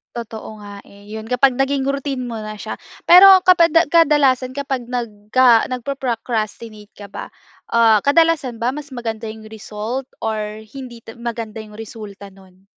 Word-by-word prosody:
Totoo 220 -2 -8
nga, 205 -1 -10
eh, 200 +1 -18
‘yon 220 +1 -7
kapag 250 +2 +2
naging 270 0 0
routine 275 -2 -2
mo 230 - -6
na 215 0 -8
siya. - - -6 0.3
Pero 380 +2 +9
kapag 340 -3 +6
da 330 0 +4
kadalasan, 285 -6 +3
kapag 270 -2 -4
nagka 235 0 +2
nagpo-procrastinate 230 -4 -4
ka 205 -1 -12
ba, - - -9 0.4
ah, 225 -3 +4
kadalasan 285 -6 +2
ba 245 +3 -1
mas 295 -1 -9
maganda 225 -3 -5
'yong 220 0 -12
result, 220 +4 -6 0.2
or 215 -1 -4
hindi 250 -1 -10
ta 225 0 -13
maganda 230 -2 -6
'yong 210 0 -14
resulta 205 -2 -9
no’n? 190 0 -20
235 Hz, 155 wpm, -19 LUFS, 215-270 Hz, 0.4 s, Pero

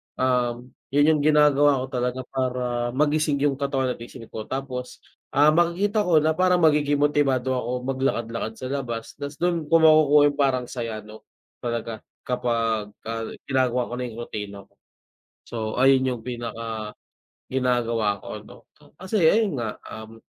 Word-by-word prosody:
Um, 125 -1 0 0.2
yun 145 +2 +3
yung - - -2
ginagawa 145 -2 +4
ko - - -2
talaga 125 0 -1
para 125 -2 -1
magising 150 +1 +2
yung 140 -2 +2
katawan 135 -2 0
at - - -16
isip 115 0 -10
ko, 110 - -6
tapos, 130 0 -5 0.3
ah, 145 +2 +4
makikita 175 +6 +2
ko 170 -5 +4
na 155 +1 +1
parang 180 0 +3
magiging 145 -2 +3
motibado 135 -3 +2
ako 125 0 -2
maglakad-lakad 115 -4 -2
sa 130 - -5
labas 120 -5 -4
ta's 140 0 -6
do'n 170 -2 0
ko - - +6
makukuha 155 -2 +6
yung 145 - -12
parang 130 -3 +2
saya 115 -3 -4
'no, 110 +1 -14 0.3
talaga 115 -2 -4 0.2
kapagka 115 -2 -2
ginagawa 125 -2 +1
ko - - -4
na - - -2
yung 115 0 -9
rutina 100 -3 -7
ko. - - -31 0.7
So - - -9 0.2
ayun 130 0 +4
yung 125 -3 -3
pinaka, 115 -3 -5 0.6
ginagawa 120 -5 0
ko - - -9
'no - - -14 0.4
kasi 190 +3 -1
ayun 190 - +3
nga, 110 -2 -4 0.2
um 110 +1 -10
130 Hz, 155 wpm, -24 LUFS, 115-145 Hz, 0.7 s, ko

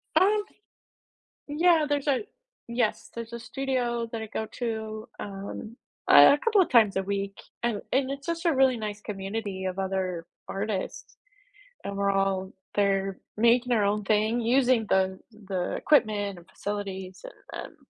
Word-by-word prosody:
Um 415 +2 +4 1.0
Yeah, 320 +1 +4
there's 290 0 -1
a 280 +9 +1 0.4
yes, 235 -2 -1
there's 230 0 -6
a 235 - -4
studio 240 -2 -2
that 225 -1 -4
I 220 - -5
go 220 +1 -3
to, 220 -1 -4
um, 200 +3 -7 0.3
a 145 - +9
couple 435 -4 +4
of - - +1
times 220 -6 +5
a 190 - 0
week, 200 0 -3 0.3
and 230 -4 0
and 265 0 +1
it's 275 +3 -6
just 335 0 -2
a 330 - +4
really 260 -2 +4
nice 210 -1 -5
community 195 -1 -4
of 185 +1 -3
other 185 -3 -2 0.2
artists. 195 -1 -4 0.7
And 200 0 -4
we're 200 0 +2
all 195 -1 0 0.2
they're 195 -1 +1 0.2
making 235 +2 +4
their 215 -4 +3
own 205 0 0
thing, 215 +3 +2
using 245 -1 +3
the 190 0 +2 0.3
the 185 -2 -1
equipment 210 -9 +2
and 175 +2 -17
facilities 190 -3 -5
and, - - -9
um - - -21
215 Hz, 155 wpm, -27 LUFS, 195-250 Hz, 1.0 s, a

